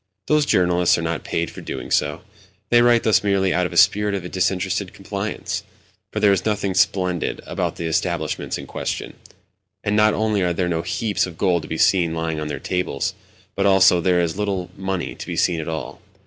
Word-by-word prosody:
Those 150 -1 +2
journalists 90 -1 +3
are 85 - -3
not 85 -2 -2
paid 85 0 -2
for - - -10
doing - - -6
so: - - 0 0.5
they 120 0 +6
write 120 -1 +4
thus 110 - +3
merely 100 -2 +2
out 90 0 +1
of - - -13
a - - -4
spirit 100 +1 +4
of 90 -2 -5
disinterested 95 +1 -1
complaisance. 100 +2 -4 0.5
For - - -2
there 105 - +5
is 95 -2 +1
nothing 105 -3 -1
splendid 90 -2 +1
about - - -2
the 85 - -5
establishments 80 - -1
in - - -8
question; - - -4 0.7
and, 100 - 0
not 105 0 +4
only 110 -2 +1
are 90 -1 +1
there 90 +1 -1
no 85 -2 -1
heaps 105 +2 -1
of 85 -2 -10
gold 90 -4 +2
to 80 - -9
be 80 - -4
seen 85 -3 +3
lying 80 -1 -2
on 75 - -3
their 75 -2 -4
tables, 90 -4 -2 0.4
but 100 0 +1
also 95 -2 +5
there 90 0 +2
is 85 -2 0
very 95 - -8
little 100 -4 -2
money 95 -2 -3
to - - -9
be - - -4
seen 85 -2 +2
at 80 - -4
all. 80 -1 -5
95 Hz, 210 wpm, -22 LUFS, 85-100 Hz, 0.7 s, they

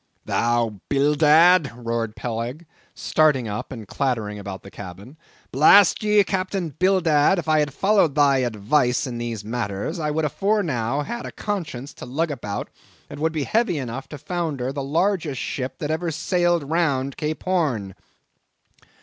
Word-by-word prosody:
"Thou 115 -4 0
Bildad!" 150 +3 +5
roared 115 -2 -3
Peleg, 120 +7 -4 0.3
starting 150 -6 +2
up 105 +5 -5
and 115 -5 -8
clattering 110 -6 -2
about 100 -1 -7
the 100 - -12
cabin. 100 - -10 0.4
"Blast 165 +8 +6
ye, 210 -1 +4
Captain 185 -2 -2
Bildad, 175 0 +3
if 170 - -4
I 155 0 +4
had 150 -1 0
followed 195 -1 +2
thy 140 -2 +4
advice 125 +2 +1
in 120 -3 -5
these 115 -3 -4
matters, 115 - -3
I 155 -1 -1
would 155 +1 0
afore 205 +7 +1
now 135 -2 -1
had 235 +10 -5
a - - -7
conscience 160 - -5
to - - -10
lug 155 +6 -1
about 105 -7 -5 0.4
that - - -9
would 160 +1 +1
be 155 -3 -2
heavy 220 - +1
enough 130 0 -5
to 150 - -7
founder 150 -5 -3
the 140 - -3
largest 160 -1 0
ship 130 -1 -4
that 150 0 -3
ever 165 +2 -1
sailed 175 +1 +1
round 140 -5 0
Cape 155 0 -4
Horn." 140 - 0
145 Hz, 160 wpm, -23 LUFS, 120-170 Hz, 0.4 s, Blast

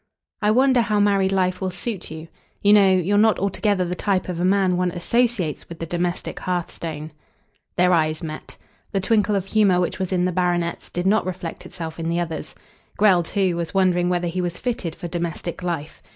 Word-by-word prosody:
"I 210 - +2
wonder 255 +2 +4
how 215 -2 +1
married 200 -2 +3
life 185 -1 0
will 190 - 0
suit 190 +2 -5
you. 160 +1 -8 0.4
You 205 0 +6
know, 200 -2 +6
you're 185 +2 +2
not 220 0 +4
altogether 200 -1 0
the 175 - -2
type 185 0 -1
of 175 -2 -3
a - - 0
man 190 -1 +3
one 180 0 +1
associates 190 - 0
with 170 - -8
the 165 - -4
domestic 175 +1 -3
hearthstone." 165 -3 -4 0.6
Their 180 0 +4
eyes 155 -1 +1
met. 155 -1 -7 0.4
The 195 - +2
twinkle 210 +1 +2
of 195 -2 -1
humour 195 -3 +3
which 180 +1 -1
was 185 -1 -2
in 180 -1 +1
the 180 - +1
baronet's 175 -1 -1
did 175 +1 -3
not 200 -1 +2
reflect 180 -2 -6
itself 165 -2 -7
in 165 0 -2
the 170 +1 0
other's. 160 -3 -4 0.4
Grell, 195 -4 +5
too, 185 +1 0
was 170 +2 -4
wondering 180 -2 +3
whether 175 -1 0
he 180 +2 -2
was 175 -1 -3
fitted 210 -10 -3
for 175 - -6
domestic 170 0 -4
life. 170 -4 -4
180 Hz, 200 wpm, -22 LUFS, 170-200 Hz, 0.6 s, You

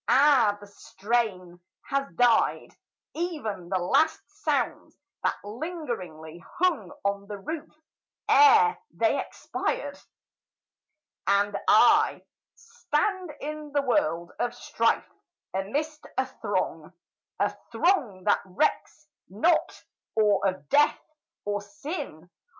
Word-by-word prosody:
Ah, 260 -7 +5
the 205 - -11
strain 200 -3 -2 0.3
Has 275 0 -1
died 245 -2 +3 0.4
ev'n 285 - -4
the 190 - +1
last 300 - +2 0.2
sounds - - -1 0.2
that - - +1
lingeringly 205 - -6
Hung 320 - +1
on 200 0 -1
the 205 -1 -6
roof 315 +10 -6 0.6
ere 440 +1 +6
they - - +1
expired! - - -4 1.3
And 200 +1 +2
I, - - +5 0.3
Stand 380 -6 -2
in 300 0 -6
the 285 -1 +2
world 240 - 0
of 240 0 -1
strife, - - 0 0.5
amidst 290 +11 -3
a - - +2
throng, - - -3 0.5
A - - +1 0.2
throng 250 - +1
that 205 - +3
recks 305 +8 -1 0.2
not 275 - +1 0.3
or 210 -3 +3
of 185 -7 -4
death, 295 +1 +4 0.5
or 205 0 -1
sin! 205 - -7
235 Hz, 105 wpm, -27 LUFS, 200-305 Hz, 1.3 s, ere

